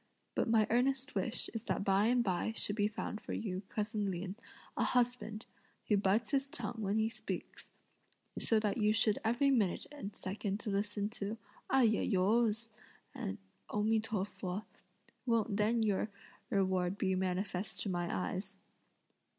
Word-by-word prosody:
but - - +1
my 220 -1 +5
earnest 265 +3 +2
wish 230 - 0
is 225 0 -4
that - - 0
by 195 +2 +4
and 245 0 +4
by 185 +2 0
should 205 - 0
be 205 -1 +3
found 215 0 -4
for - - -5
you, 190 -4 -2
cousin 210 -1 -1
Lin, 185 +1 -3 0.4
a - - +1
husband, 245 -3 +1 0.4
who 210 - +6
bites 205 +3 +2
his 275 0 +1
tongue 240 -3 -3
when 205 0 0
he 220 0 +3
speaks, 215 -1 -6 0.7
so 225 - +3
that 215 +1 0
you 210 0 +4
should 220 -1 +3
every 240 +5 +3
minute 215 -9 +2
and 265 -9 -7
second 200 +2 -3
listen 205 0 0
to 210 0 -4 0.3
'ai 265 -1 +6
ya 215 -3 +3
os!' 225 +3 +2 1.0
O 210 - 0
mi 220 +1 +4
to 215 -3 -1
fu, 195 0 -4 0.6
won't 225 -3 +2
then 220 +2 +3
your 210 0 +1 0.4
reward 185 -1 +1
be 190 -2 +1
manifest 185 +1 -1
to - - -2
my 175 -2 -1
eyes!" 190 +2 -3
210 Hz, 160 wpm, -35 LUFS, 195-225 Hz, 1.0 s, who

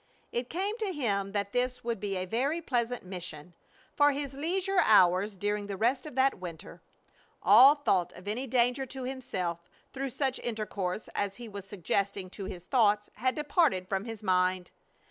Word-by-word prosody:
It 240 +1 -3
came 400 +7 -2
to 425 -3 -1
him 200 - 0
that 200 -1 -1
this 250 0 -1
would 235 -2 -2
be 195 -1 -2
a 185 - -2
very 265 - 0
pleasant 245 -6 -1
mission, 175 -3 -7 0.4
for 290 0 +5
his 280 -1 -4
leisure 365 +7 0
hours 195 0 +4
during 205 +1 -1
the 200 -1 -4
rest 250 +7 +1
of 295 - -9
that 265 -4 +2
winter. 170 -3 -9 0.6
All 250 +9 +8
thought 195 - +1
of 185 - -13
any 240 +6 -2
danger 250 +2 +1
to 260 +1 -6
himself 185 -10 -4 0.2
through 270 0 -3
such 265 +1 -1
intercourse 210 -4 -3
as 200 -1 -2
he 240 -1 -9
was 200 -2 -8
suggesting 195 0 -2
to 195 - -7
his 180 -2 -7
thoughts 210 -2 +2
had 255 +4 0
departed 295 - +1
from 195 +1 -2
his 225 -2 -7
mind. 185 -1 +1
220 Hz, 175 wpm, -30 LUFS, 190-265 Hz, 0.6 s, All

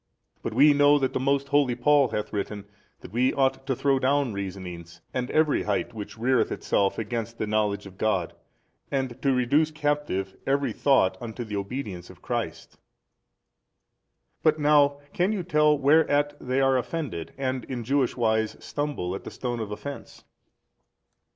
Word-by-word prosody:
But - - -4
we 145 +4 +7
know 145 0 +5
that 135 -2 -1
the - - 0
most 140 +1 0
holy 145 -4 +3
Paul 145 +2 +4
hath 105 -2 -4
written 100 0 -4 0.4
that - - -11
we 125 +3 +3
ought 135 -1 0
to 135 - +1
throw 135 +1 +2
down 135 -2 +1
reasonings 90 -3 -7
and 125 0 -2
every 155 -1 +2
height 105 +3 -1
which 105 0 -8
reareth 125 +2 +2
itself 100 -1 0
against 115 +1 -4
the - - -1
knowledge 105 -1 0
of 95 -1 -13
God 110 -1 0 0.6
and 130 -3 -2
to 140 - +2
reduce 135 +5 +2
captive 145 -11 -2
every 140 +1 +1
thought 95 -10 +2
unto 120 0 -5
the 105 -2 -6
obedience 100 -3 -5
of - - -14
Christ. - - -4 1.6
But 155 -1 +3
now, 145 -1 +4 0.2
can 180 +4 +1
you 195 -4 -2
tell 150 -3 +3
whereat 145 0 +3
they 130 +1 0
are 135 -1 +3
offended 125 - -4
and 130 -2 -2
in 125 -3 -5
Jewish 135 +1 +1
wise 110 -2 +1
stumble 145 -12 -3
at 95 - -6
the - - -7
stone 120 -2 -4
of 110 -2 -4
offence? 140 +7 -8
130 Hz, 165 wpm, -26 LUFS, 110-145 Hz, 1.6 s, we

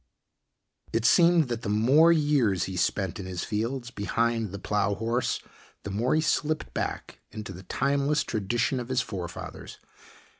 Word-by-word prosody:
It 115 0 0
seemed 170 +4 +5
that 120 -2 -3
the 110 - -4
more 130 +11 +5
years 145 - +2
he 95 - -4
spent 95 0 -1
in 95 - -6
his 90 -1 -4
fields 120 +3 -3
behind 115 +1 0
the 100 - -5
plow 105 0 0
horse, 115 +4 -1 0.4
the 100 - -5
more 115 +8 +1
he 155 - +3
slipped 155 -1 -1
back - - -4
into 105 -3 -7
the 90 - -10
timeless 140 +9 0
tradition 120 +4 -1
of 120 0 -6
his 130 0 +2
forefathers. 90 -5 -7
115 Hz, 155 wpm, -27 LUFS, 100-140 Hz, 0.4 s, seemed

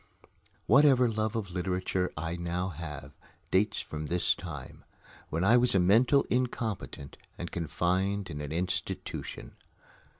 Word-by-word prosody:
Whatever 135 -1 +6
love 110 0 -1
of 105 -5 -3
literature 90 0 -1
I 80 +2 -2
now 85 +2 -2
have 75 -4 -7 0.4
dates 100 +3 +2
from 75 0 -6
this 90 +2 +2
time, 80 -7 -8 0.5
when 80 +3 -1
I 115 +5 +6
was 125 -3 +3
a - - +5
mental 115 +10 +5
incompetent 115 - -2 0.2
and 85 - -5
confined 90 +4 -1
in 75 -1 -5
an 75 -1 -5
institution. 90 +3 -4
90 Hz, 130 wpm, -30 LUFS, 85-110 Hz, 0.5 s, Whatever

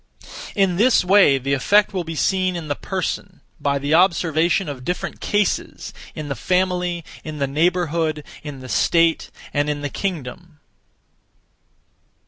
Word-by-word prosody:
In 195 -3 +2
this 235 -1 +4
way 190 -7 +6
the 135 +1 -2
effect 205 +10 +3
will 185 -2 -1
be 165 0 -6
seen 185 +2 +1
in 165 -3 -6
the 145 - 0
person, 185 +1 -4 0.2
by 140 -1 0
the 140 +2 -1
observation 170 +1 +3
of 135 -3 -6
different 180 +6 -4
cases; 205 -2 -1 0.2
in 155 -1 -5
the 140 - -2
family; 180 +3 0 0.2
in 155 -1 -6
the 140 - 0
neighbourhood; 160 +1 0 0.2
in 145 -3 -8
the 130 - -9
state; 165 +5 +2 0.2
and 145 0 +1
in 145 -1 -2
the 145 - -3
kingdom. 165 -2 -5
165 Hz, 145 wpm, -21 LUFS, 145-185 Hz, 0.2 s, way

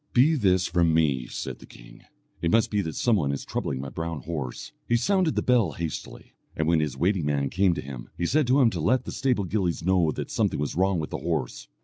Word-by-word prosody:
"Be 135 +6 +5
this 95 - +2
from 85 -2 +2
me," 70 -7 +1
said - - -6
the - - -14
king; - - -15 0.4
"it 85 - +1
must 115 +6 +3
be 105 -1 +1
that 80 -4 -5
some 120 -3 +2
one 70 -6 0
is 70 - -4
troubling 65 - -3
my 70 +1 -5
brown 80 +2 -4
horse." 70 -5 -5 0.2
He 120 - +2
sounded 180 +5 +1
the - - 0
bell 115 - +3
hastily, 85 -3 -6 0.2
and 80 - -1
when 85 -1 +3
his 75 -4 -2
waiting 90 0 +1
man 70 -2 0
came 95 -1 +2
to - - -4
him, 65 -3 -8
he 85 - -1
said 145 - +2
to 130 +3 +4
him 115 -3 +4
to 85 - -3
let 125 +10 +2
the - - -5
stable 125 -6 0
gillies 90 -3 -1
know 90 -3 +3
that - - -5
something - - 0
was 75 - -2
wrong 95 +1 +1
with 80 -2 -4
the - - -3
horse. 65 -7 -3
85 Hz, 245 wpm, -26 LUFS, 75-105 Hz, 0.4 s, Be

